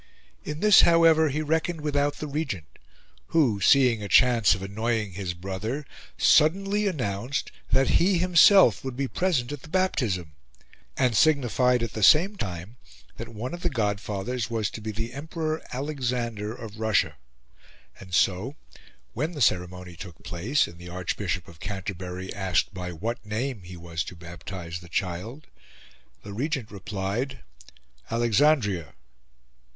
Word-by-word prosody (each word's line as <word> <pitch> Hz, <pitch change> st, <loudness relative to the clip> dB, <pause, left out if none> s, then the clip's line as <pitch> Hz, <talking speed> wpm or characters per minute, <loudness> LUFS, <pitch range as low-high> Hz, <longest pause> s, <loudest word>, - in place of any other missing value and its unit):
In 150 Hz, +1 st, -5 dB
this, 210 Hz, -2 st, +8 dB
however, 165 Hz, -2 st, +5 dB
he 150 Hz, +3 st, -2 dB
reckoned 160 Hz, +2 st, -1 dB
without 145 Hz, -1 st, 0 dB
the -, -, -6 dB
Regent, 140 Hz, -, -4 dB, 0.5 s
who, 125 Hz, -12 st, +2 dB
seeing 125 Hz, -1 st, +5 dB
a 100 Hz, -, -4 dB
chance 115 Hz, 0 st, +5 dB
of 95 Hz, -, -7 dB
annoying 110 Hz, +1 st, -2 dB
his 90 Hz, -1 st, -4 dB
brother, 100 Hz, -, -4 dB, 0.3 s
suddenly 195 Hz, +6 st, +3 dB
announced 125 Hz, -, -2 dB, 0.2 s
that 135 Hz, 0 st, +4 dB
he 185 Hz, +1 st, +3 dB
himself 180 Hz, -, +6 dB
would 130 Hz, -2 st, -5 dB
be 140 Hz, 0 st, -1 dB
present 145 Hz, -7 st, 0 dB
at 145 Hz, -2 st, -6 dB
the -, -, -12 dB
baptism, 120 Hz, -, 0 dB, 0.7 s
and 125 Hz, -3 st, +2 dB
signified 125 Hz, -3 st, +3 dB
at 115 Hz, -, -4 dB
the 110 Hz, -, -4 dB
same 170 Hz, -, +6 dB
time 95 Hz, -, -6 dB, 0.4 s
that 115 Hz, -, -6 dB
one 115 Hz, +5 st, -6 dB
of 175 Hz, -, -6 dB
the 175 Hz, -, +1 dB
godfathers 105 Hz, +1 st, -2 dB
was 110 Hz, -4 st, -1 dB
to 110 Hz, -, -8 dB
be 110 Hz, -, -5 dB
the 115 Hz, +3 st, -4 dB
Emperor 155 Hz, +2 st, -3 dB
Alexander 125 Hz, -6 st, -2 dB
of 110 Hz, -2 st, -9 dB
Russia. 110 Hz, -3 st, +1 dB, 0.8 s
And 95 Hz, -1 st, -12 dB
so 95 Hz, +9 st, +1 dB, 0.6 s
when 155 Hz, +8 st, -2 dB
the 150 Hz, -, -7 dB
ceremony 90 Hz, -5 st, 0 dB
took 90 Hz, -2 st, -11 dB
place, 90 Hz, -, 0 dB
and 85 Hz, -, -12 dB
the 90 Hz, 0 st, -9 dB
Archbishop 90 Hz, 0 st, -3 dB
of 85 Hz, -3 st, -14 dB
Canterbury 95 Hz, -2 st, -5 dB
asked 95 Hz, +1 st, 0 dB
by 90 Hz, -1 st, -5 dB
what 110 Hz, +8 st, -4 dB
name 110 Hz, +2 st, -3 dB
he 90 Hz, 0 st, -10 dB
was 85 Hz, -2 st, -4 dB
to -, -, -8 dB
baptise 85 Hz, 0 st, -7 dB
the 85 Hz, 0 st, -14 dB
child, 90 Hz, -, -3 dB, 0.8 s
the 100 Hz, -, -8 dB
Regent 135 Hz, 0 st, -2 dB
replied 105 Hz, +6 st, -4 dB, 0.7 s
"Alexandria." 115 Hz, -, +2 dB
115 Hz, 145 wpm, -26 LUFS, 95-145 Hz, 0.8 s, this